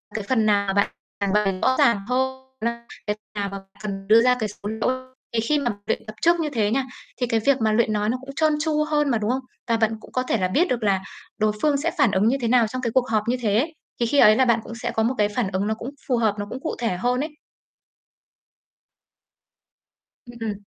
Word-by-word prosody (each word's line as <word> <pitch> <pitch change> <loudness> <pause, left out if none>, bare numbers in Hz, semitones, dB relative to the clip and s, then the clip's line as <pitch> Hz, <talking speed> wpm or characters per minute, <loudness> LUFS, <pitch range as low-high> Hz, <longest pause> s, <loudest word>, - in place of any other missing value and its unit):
cái 215 - -2
phần 225 +1 +1
nào 200 -2 +2
bạn 200 +1 +2 0.3
trình 200 -1 0
bày 195 -3 +1
rõ 260 - +3
ràng 205 -4 +3
hơn, 260 +1 -1 0.2
là 235 +1 -2 0.2
cái 210 - 0 0.2
nào 200 -1 -2
mà 195 0 -7 0.2
cần 195 -2 -5
đưa 220 +2 +7
ra 250 +1 +4
cái 215 -2 -1
số 205 0 -7
liệu. 255 +4 -2 0.2
Thì 230 - +1
khi 295 +7 +1
mà 245 -4 0
luyện - - -2
tập 215 0 -9
trước 340 +1 +4
như 315 -2 0
thế 220 -7 0
nha, 270 +3 +1 0.3
thì 245 - -1
cái 230 -1 +1
việc 270 +3 +2
mà 220 -1 +3
luyện 220 0 +2
nói 210 0 0
nó 250 - 0
cũng 270 - -12
trơn 310 +1 +3
tru 305 0 +1
hơn 300 -1 +1
mà, 240 - +2
đúng 215 0 -2
không? 260 +1 -1 0.3
Và 230 -1 +2
bạn 220 0 +1
cũng - - -15
có 255 - 0
thể 240 - 0
là 185 -3 +1
biết 305 - +2
được 240 -7 -1
là 195 -2 +2 0.3
đối 215 -1 +2
phương 295 -2 +3
sẽ 310 +4 -1
phản 280 -8 +4
ứng 200 +2 +2
như 260 +4 +3
thế 235 - 0
nào 235 -1 +4
trong 255 +4 -5
cái 235 -3 -1
cuộc 260 +1 +1
họp 215 -2 +1
như 245 +2 +1
thế. 230 +9 +1 0.3
Thì 240 - +2
khi 280 +5 +2
ấy 215 -4 +8
là 260 - +4
bạn 235 -2 +3
cũng 230 - -8
sẽ 230 - -3
có 220 - 0
một 245 +4 +1
cái 210 -1 +2
phản 210 -1 -1
ứng 195 +2 -1
nó 220 - +1
cũng 230 +3 -6 0.2
phù 250 - +2
hợp, 220 -3 +2
nó 205 - -2
cũng 255 - -5
cụ - - -3
thể 230 -7 -1
hơn 245 +6 0
ấy. 300 +3 -2 3.0
Ừm, 240 0 -11
ừm. 225 -2 -2
230 Hz, 260 wpm, -23 LUFS, 210-260 Hz, 3.0 s, ấy